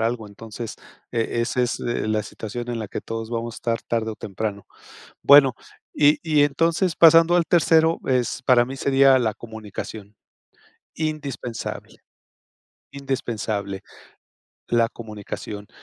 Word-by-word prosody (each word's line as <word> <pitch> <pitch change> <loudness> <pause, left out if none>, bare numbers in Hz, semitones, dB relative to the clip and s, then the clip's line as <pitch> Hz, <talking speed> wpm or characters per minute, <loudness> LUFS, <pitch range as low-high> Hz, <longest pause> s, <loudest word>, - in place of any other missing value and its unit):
algo. 115 -1 -1
Entonces, 110 +2 -8 0.3
eh, 115 -2 -1
ese 125 +2 0
es. 120 - -3
eh, 120 -2 -2
la 110 0 +1
situación 120 +4 -6
en 120 - -3
la 110 -2 -5
que - - -5
todos 115 0 -5
vamos 115 0 -4
a - - -10
estar 115 -1 -2
tarde 110 -1 -2
o - - -8
temprano. 100 0 -5 0.6
Bueno, 140 -3 +7 0.4
y 150 0 +4
y 155 -3 +3
entonces, 165 +4 +1
pasando 165 +1 +7
al 175 - +4
tercero, 160 0 +3
es 125 -1 0
para 125 -2 +5
mí, 135 +2 -7
sería 135 -1 +4
la 110 -3 0
comunicación, 110 -2 -9 0.8
indispensable, 140 -7 -5 0.9
indispensable 110 -8 -3 0.9
la 115 -1 +3
comunicación. 105 -2 -8
120 Hz, 135 wpm, -23 LUFS, 110-140 Hz, 0.9 s, Bueno